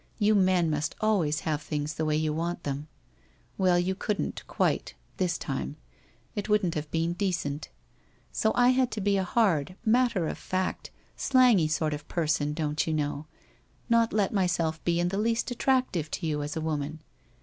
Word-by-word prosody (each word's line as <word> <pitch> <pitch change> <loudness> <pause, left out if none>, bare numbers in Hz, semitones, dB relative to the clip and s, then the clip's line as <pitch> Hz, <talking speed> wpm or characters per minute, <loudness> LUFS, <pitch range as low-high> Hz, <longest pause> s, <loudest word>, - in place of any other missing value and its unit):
You 215 -1 +3
men 185 -4 +3
must 150 +1 -1
al 215 -1 +3
ways 155 -1 0
have 155 -2 -1
things 150 0 -3
the 160 - -2
way 155 -1 +1
you 155 0 0
want 170 +2 -3
them. 145 +1 -4 0.7
Well, 185 -2 +4
you 180 +2 +1
couldn't, 205 +1 -2
quite - - 0
— - - -34
this 180 -3 0
time 135 +1 -4 0.3
— - - -35
it 205 0 -3
wouldn't 210 -5 +2
have 150 -1 -4
been 165 +2 0
decent. 175 -6 -2 0.6
So 220 - +1
I 245 0 +5
had 255 -1 +3
to 215 - -3
be 200 0 +2
a 190 - +1
hard, 185 -6 +1
matter 230 -6 +3
of - - -4
fact, 185 0 -2 0.3
slangy 250 - +4
sort 155 0 0
of 145 0 -7
per 170 -2 -1
son, 150 -1 +1
don't 150 -1 -1
you 160 - 0
know 145 0 -2 0.3
— - - -36
not 230 -1 +4
let 205 -1 +1
myself 175 -5 0
be 170 0 +1
in 175 0 +1
the 195 +2 -2
least 230 +3 0
at 245 - -5
tractive 255 - +1
to 170 - -4
you 150 -2 -1
as 145 +1 -4
a - - -2
woman. 155 0 -3
175 Hz, 200 wpm, -28 LUFS, 155-205 Hz, 0.7 s, I